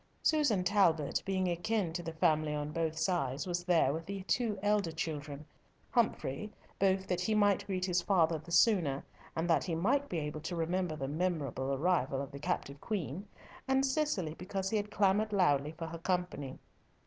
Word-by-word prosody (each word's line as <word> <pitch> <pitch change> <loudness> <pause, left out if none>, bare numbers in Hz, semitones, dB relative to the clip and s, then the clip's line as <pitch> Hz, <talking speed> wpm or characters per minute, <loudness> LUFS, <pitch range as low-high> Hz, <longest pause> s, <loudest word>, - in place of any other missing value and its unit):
Susan 285 - +3
Talbot, 170 -7 +2
being 190 -1 +1
akin 175 +1 0
to 175 - -3
the 165 -1 -5
family 155 -2 +2
on 150 0 -3
both 160 0 -1
sides, 160 -6 0
was 175 -1 -2
there 165 -6 +3
with 160 +1 -5
the 195 -1 -5
two 220 +1 0
elder 205 -4 +2
children; 150 -2 -4 0.5
Humfrey, 210 - 0 0.3
both 190 0 +2
that 180 -2 -1
he 220 - +1
might 205 -2 +3
greet 185 -2 -1
his 180 -1 +1
father 170 -3 +2
the 165 +3 -12
sooner, 165 - +3 0.3
and 165 +1 -1
that 165 - +3
he 170 -3 -1
might 265 +12 +1
be 175 - -2
able 150 0 -3
to 165 +3 -4
remember 170 0 -1
the 135 -3 -4
memorable 145 -4 -1
arrival 140 -2 +1
of 140 0 -5
the 140 - -8
captive 145 -3 -3
queen, 195 -2 -3 0.4
and 265 0 +3
Cicely, 265 - 0
because 190 +3 -4
he 220 - +2
had 205 0 -2
clamoured 210 +1 +2
loudly 150 -7 +2
for 165 - -4
her 165 +1 -7
company. 175 -7 -2
175 Hz, 185 wpm, -33 LUFS, 155-195 Hz, 0.5 s, Susan